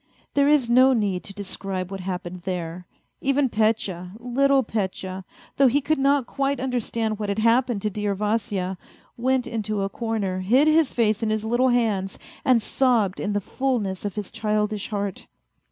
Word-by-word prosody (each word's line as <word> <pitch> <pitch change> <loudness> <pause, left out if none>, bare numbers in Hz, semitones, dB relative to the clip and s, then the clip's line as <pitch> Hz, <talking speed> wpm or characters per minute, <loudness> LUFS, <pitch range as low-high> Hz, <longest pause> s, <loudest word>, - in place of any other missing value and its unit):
There 280 0 +3
is 290 -4 +4
no 255 +3 +6
need 200 -6 0
to 200 - -7
describe 195 -2 -5
what 195 - -5
happened 180 -1 -5
there! 175 -1 -4 0.3
Even 275 0 +2
Petya, 210 -5 0
little 270 +3 +2
Petya, 190 -3 -3 0.3
though 275 - +6
he 265 +4 +3
could 295 +1 0
not 275 -1 +3
quite 275 +1 -1
understand 230 -4 -2
what 210 -1 -2
had 200 - -1
hap 230 +3 +3
pened 230 -5 -2
to 210 - -1
dear 205 0 -1
Vasya, 205 -3 -1 0.4
went 255 +1 +1
into 215 -2 -2
a 195 - -1
corner, 210 -4 -2
hid 245 +11 +3
his 310 -2 +4
face 215 -2 +1
in 225 - 0
his 215 0 -1
little 240 +3 +2
hands, 215 -6 0 0.3
and 255 -6 +3
sobbed 230 -8 +1
in 210 - -1
the 205 - +1
fullness 220 -5 -2
of 205 -3 -4
his 210 -2 -5
childish 210 -1 -1
heart. 200 -2 -4
215 Hz, 175 wpm, -24 LUFS, 195-255 Hz, 0.4 s, no